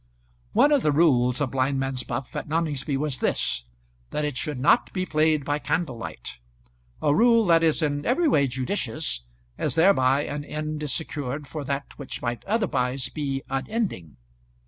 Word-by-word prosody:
] - - -37
One 295 - +5
of 290 -3 +4
the 150 - +2
rules 130 -5 +3
of 140 - 0
blindman's 135 -1 0
buff 125 +2 -5
at - - -4
Noningsby 150 -4 -1
was 145 -2 -1
this, 60 -1 0 0.4
that 150 - -1
it 145 -3 -3
should 145 0 -3
not 190 - +3
be 185 -1 -1
played 155 -3 +2
by 145 0 0
candlelight, 120 - -3 0.6
a 145 - +4
rule 230 +5 +5
that 165 -2 +5
is 160 0 +2
in 145 -1 0
every 315 +8 +2
way 140 - +3
judicious, 130 - -2 0.3
as - - 0
thereby 145 -6 +4
an 145 0 -4
end 155 +1 -4
is 150 -2 -2
secured 145 -1 -3
for 150 +1 -6
that 140 +1 -4
which 140 - -6
might 120 -1 -3
otherwise 135 - 0
be 135 -2 -3
unending. 135 - -3
145 Hz, 170 wpm, -25 LUFS, 130-160 Hz, 0.6 s, One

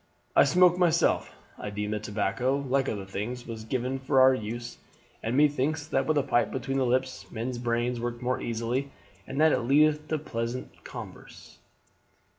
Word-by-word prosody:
"I - - +7
smoke 180 +4 +5
myself; 170 -2 +2 0.3
I - - -4
deem 105 0 -3
that 105 -1 -2
tobacco, 105 +6 0
like 135 -1 0
other 100 -3 -4
things, 105 +6 -5
was 115 -2 -7
given 130 +3 -2
for 130 0 +2
our 130 0 +7
use, 120 0 -5 0.4
and 115 +4 -1
methinks 145 +1 +2
that 155 - 0
with 155 -1 +2
a 145 - +3
pipe 125 -3 +2
between 135 +1 -3
the 130 -2 +2
lips 125 -6 -1
men's 120 +3 -4
brains 120 0 -1
work 120 0 -3
more 125 +1 -1
easily 120 +4 -2 0.4
and 135 - -4
that 160 0 +6
it - - +2
leadeth 150 +4 +3
to 155 - 0
pleasant 125 -3 -5
converse." - - -10
130 Hz, 175 wpm, -28 LUFS, 115-140 Hz, 0.4 s, I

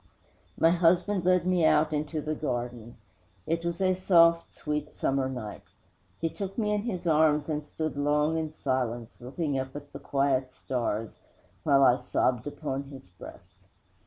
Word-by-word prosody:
'My 165 - +5
husband 180 +2 +2
led 180 -1 +3
me 180 -2 +2
out 155 0 +4
into 150 +1 -2
the 155 +1 -2
garden. 120 -5 -4 0.5
It 165 +1 -1
was 170 +1 -3
a 185 -1 +3
soft, 170 -2 +4
sweet, 150 0 -4
summer 135 -1 0
night. 120 -5 -6 0.6
He 165 - 0
took 195 +3 -6
me 210 -2 0
in 210 -1 +1
his 190 -6 -4
arms 150 -2 +3
and 150 -1 -2
stood 155 +1 -4
long 150 +2 +1
in 160 -1 -2
silence, 125 -6 -3
looking 140 +2 -2
up 130 0 -5
to 145 - -7
the 140 - -7
quiet 135 -2 0
stars, 115 -4 -3 0.4
while 140 -2 +4
I 125 -1 +6
sobbed 125 0 0
upon 140 -2 -4
his 135 -8 -12
breast. 90 - -14
150 Hz, 160 wpm, -28 LUFS, 130-170 Hz, 0.6 s, I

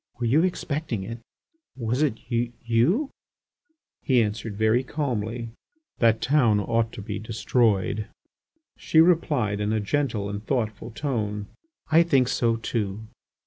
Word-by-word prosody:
Were 120 - -1
you 135 +7 +4
expecting 150 - -2
it? 115 +4 -6 0.6
Was 120 +2 -1
it 150 -7 +2
you.. 120 - 0 0.5
." 320 -2 -51
He 125 -4 +3
answered 105 0 -4
very 110 +4 +3
calmly: 120 -5 -3 0.5
"That 115 -2 +3
town 125 -7 +3
ought 115 +2 0
to 110 - -7
be 105 0 -4
destroyed." 110 -2 0 0.7
She 160 - +3
replied 150 - +3
in 105 0 0
a 110 - +1
gentle 115 -2 -1
and 100 0 -5
thoughtful 110 -4 -2
tone: 110 -5 -3 0.4
"I 160 +2 +7
think 135 -7 +3
so 115 -1 +1
too." 110 -2 -3
115 Hz, 135 wpm, -25 LUFS, 105-135 Hz, 0.7 s, I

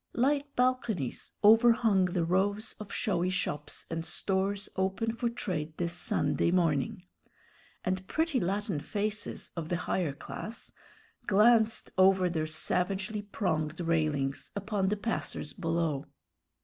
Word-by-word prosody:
Light 280 +3 +1
balconies 240 - 0
overhung 225 -2 +6
the 175 -2 0
rows 200 +5 0
of 210 -2 -8
showy 180 -3 +1
shops 150 -5 -3
and 165 0 -3
stores 195 +3 -1
open 195 +4 0
for 235 0 0
trade 160 -9 -3
this 170 -1 -1
Sunday 175 - 0
morning, 170 -1 +1 0.8
and 185 +1 -1
pretty 320 -4 +1
Latin 195 -4 -1
faces 205 +6 -3
of 165 -2 -4
the 175 - 0
higher 170 -7 0
class 220 +9 -7 0.6
glanced 220 +2 +4
over 185 -1 +5
their 155 -2 -1
savagely 190 +6 0
pronged 160 -6 -2
railings 155 -5 0
upon 200 -1 0
the 210 - 0
passers 225 +2 -3
below. 165 -6 -1
190 Hz, 125 wpm, -30 LUFS, 165-215 Hz, 0.8 s, overhung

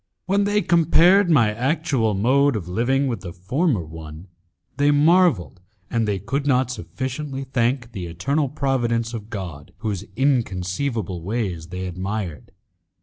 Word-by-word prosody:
When 200 +2 +2
they 205 0 +1
compared 175 +3 +5
my 115 -10 +4
actual 125 - 0
mode 135 +7 +3
of 95 -5 -4
living 120 +9 +1
with 120 -8 -2
the 85 - -7
former 110 - 0
one, 80 +2 -10 0.5
they 145 +1 +3
marvelled, 145 - +3 0.3
and 115 -2 +1
they 100 -2 0
could 135 +9 -3
not 130 -2 +2
sufficiently 130 - -5
thank 125 -1 -1
the 90 -6 -5
eternal 135 - -1
providence 120 -5 0
of 110 -2 -6
God 90 -10 -7
whose 100 -2 -2
inconceivable 110 -5 -1
ways 95 -4 -3
they 90 +1 -5
admired. 90 - -4
115 Hz, 140 wpm, -22 LUFS, 95-140 Hz, 0.5 s, compared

